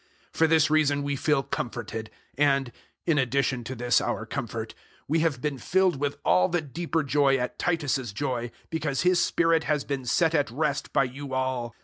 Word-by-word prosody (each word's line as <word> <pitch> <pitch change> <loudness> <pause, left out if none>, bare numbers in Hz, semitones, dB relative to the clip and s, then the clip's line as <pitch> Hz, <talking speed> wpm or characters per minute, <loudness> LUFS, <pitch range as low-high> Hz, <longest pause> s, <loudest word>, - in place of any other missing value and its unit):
007:013 - - -17
For 160 - +6
this 155 -1 +4
reason 145 -2 +3
we 140 0 -1
feel 140 0 +1
comforted; 110 -3 -4 0.3
and 135 -3 +2 0.3
in 160 -4 +2
addition 130 -1 0
to 130 - -5
this 120 0 +2
our - - -2
comfort - - -5 0.3
we 160 +3 +2
have 155 -6 0
been 150 -3 -2
filled 185 0 +2
with 145 0 -1
all 90 +1 +4
the 175 - +1
deeper 160 +2 -2
joy 140 0 +3
at 125 -1 -4
Titus's 145 -8 0
joy, 120 0 -2 0.2
because 150 -4 -1
his 180 0 +4
spirit 165 -1 +2
has 150 -2 0
been 135 -3 -4
set 165 +6 +2
at 145 -6 +2
rest 145 +3 -2
by - - +3
you 135 +1 -5
all. 130 -3 -2
140 Hz, 190 wpm, -26 LUFS, 130-155 Hz, 0.3 s, For